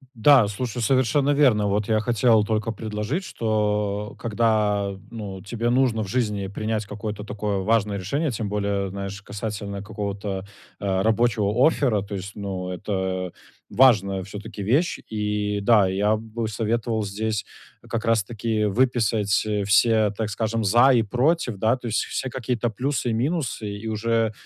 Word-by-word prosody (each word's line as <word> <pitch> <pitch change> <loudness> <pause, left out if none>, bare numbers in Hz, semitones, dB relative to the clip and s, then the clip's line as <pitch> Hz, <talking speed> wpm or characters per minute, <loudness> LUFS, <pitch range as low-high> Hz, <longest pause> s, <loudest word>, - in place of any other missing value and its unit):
Да 125 -1 +6
слушай. 120 +3 -4
Совершенно 135 +4 +2
верно 125 -8 +4
вот. 100 0 0
Я 110 -1 +2
хотел 115 -1 +3
только 110 +1 -1
предложить, 110 - -3
что 105 - -1
когда, 105 -3 +1 0.2
ну, 100 -5 -6
тебе 115 +3 -2
нужно 120 -3 +2
в - - -6
жизни 105 -3 -1
принять 110 +2 -3
какое-то 105 0 -6
такое 105 -1 -3
важное 105 0 +1
решение, 140 - -1
тем 110 -3 -3
более, 100 -1 -1
знаешь, 100 +1 -6
касательно 100 -1 -5
какого-то, 100 -2 -4 0.3
а, 95 -1 0
рабочего 110 +1 +3
оффера, 125 -10 +1
то 100 0 -6
есть, 100 +1 -6
ну, 95 -3 -4
это 95 -1 -3 0.4
важная 100 -7 +4
всё-таки 105 +1 -7
вещь. 140 - +2
И, 105 -1 -1
да, 100 -2 +4
и 95 - -3
я 105 +2 +3
бы 110 +1 -4
советовал 110 +1 -1
здесь 105 +1 -2 0.4
как 115 -1 -2
раз 115 -2 +3
таки 110 0 -1
выписать, 110 -2 +2
э, 105 -1 -1
все, 110 +1 +4
так 110 +1 -3
скажем, 110 +2 -1
за 120 +6 +5
и 115 - +4
против, 125 +2 +1
да, 110 +5 +2
то 125 -2 -7
есть 110 - 0
все 130 - -3
какие-то 125 -2 -2
плюсы 125 +3 -2
и - - 0
минусы 125 -3 -1
и 110 +2 -7
уже 115 0 0
110 Hz, 155 wpm, -24 LUFS, 100-115 Hz, 0.4 s, Да